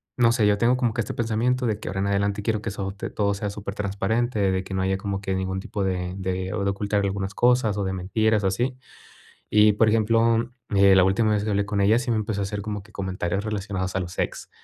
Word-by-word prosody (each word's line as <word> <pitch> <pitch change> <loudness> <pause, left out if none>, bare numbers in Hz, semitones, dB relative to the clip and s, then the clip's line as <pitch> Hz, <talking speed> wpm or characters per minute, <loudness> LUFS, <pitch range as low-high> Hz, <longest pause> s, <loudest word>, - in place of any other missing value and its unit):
no 115 -2 +4
sé, 115 -3 +2
yo 105 0 +3
tengo 120 +3 +3
como 120 -3 0
que 120 - -1
este 105 - -5
pensamiento 120 +3 0
de 110 -3 -1
que - - -9
ahora 95 +1 -3
en 100 - 0
adelante 100 +1 0
quiero 110 -1 0
que 115 - -3
eso 100 -1 -4
te 100 - -5
todo 100 -1 0
sea 105 0 -3
supertransparente, 100 +2 -1
de 95 0 -1
que 95 - -6
no 95 - 0
haya 95 0 +1
como 100 0 -3
que 95 -1 -2
ningún 95 0 -2
tipo 100 +1 -4
de 90 -1 -2
de 95 0 -3
ocultar 100 0 0
algunas 100 0 -2
cosas, 120 -3 +3
o - - 0
de 95 0 -2
mentiras, 105 +3 +1
así. 120 +7 0 0.7
Y, 105 0 +5
por 110 +2 +3
ejemplo, 115 +1 +3
mm, 115 -1 -1
eh, 100 0 +6
la 95 - +7
última 105 +3 +2
vez 105 -1 0
que - - -3
hablé 100 0 +1
con 100 0 -2
ella 105 +4 +4
sí 120 0 -3
me 115 - +2
empezó 100 -1 -2
a - - 0
hacer 100 +1 -4
como 105 -1 -4
que 105 +2 -20
comentarios 95 -1 -2
relacionados 100 -3 -3
a - - +1
los 90 -1 -7
ex. - - -3
100 Hz, 250 wpm, -24 LUFS, 95-110 Hz, 0.7 s, la